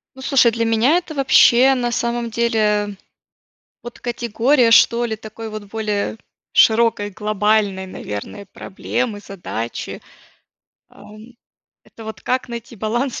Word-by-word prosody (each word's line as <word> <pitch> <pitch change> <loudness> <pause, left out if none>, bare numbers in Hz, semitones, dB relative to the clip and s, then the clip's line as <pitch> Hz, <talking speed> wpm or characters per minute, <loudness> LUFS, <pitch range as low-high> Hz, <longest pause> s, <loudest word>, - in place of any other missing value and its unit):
Ну, 265 - -11
слушай, 265 -3 +3
для 230 0 -1
меня 230 +8 +3
это 345 -3 -5
вообще, 265 -1 +5
на 245 -2 -1
самом 235 0 -2
деле, 235 0 0
э, 210 -1 +1 1.0
вот 240 - -10
категория, 240 +2 +1
что 235 +1 +5
ли, 220 -2 -4
такой 220 +1 -9
вот 215 -1 -7
более 210 0 -3 0.3
широкой, 225 -2 +3
глобальной, 210 -1 0
наверное, 105 - -7
проблемы, 215 +2 -4
задачи, 175 - -6 0.9
ам. 215 +3 -15 0.5
Это 225 - -14
вот 220 -3 -8
как 255 0 -1
найти 235 0 -8
баланс 235 +5 -2
225 Hz, 125 wpm, -19 LUFS, 210-240 Hz, 1.0 s, вообще